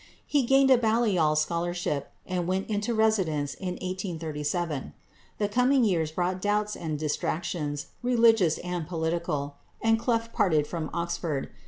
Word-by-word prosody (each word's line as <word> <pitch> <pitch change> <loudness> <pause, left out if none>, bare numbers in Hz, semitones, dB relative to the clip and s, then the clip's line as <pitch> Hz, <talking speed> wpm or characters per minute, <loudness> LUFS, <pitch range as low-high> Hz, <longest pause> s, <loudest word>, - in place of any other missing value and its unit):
He 290 - +2
gained 270 0 +5
a 255 - +7
Balliol 215 -9 +2
scholarship, 170 -1 -1
and 180 -2 -2
went 190 +3 -1
into 210 +2 -1
residence 190 -10 +1
in 185 -2 -4
1837. 165 -5 -3 0.4
The 205 - +1
coming 250 +4 +3
years 170 -7 +2
brought 180 +2 -1
doubts 210 +1 0
and 155 -3 -3
distractions, 150 0 -2 0.2
religious 230 -8 +4
and 175 -3 -4
political, 160 -4 -2 0.2
and 225 0 +3
Clough 230 -1 0
parted 155 -6 +2
from 160 -2 -4
Oxford. 170 -4 -2
180 Hz, 135 wpm, -27 LUFS, 155-215 Hz, 0.4 s, a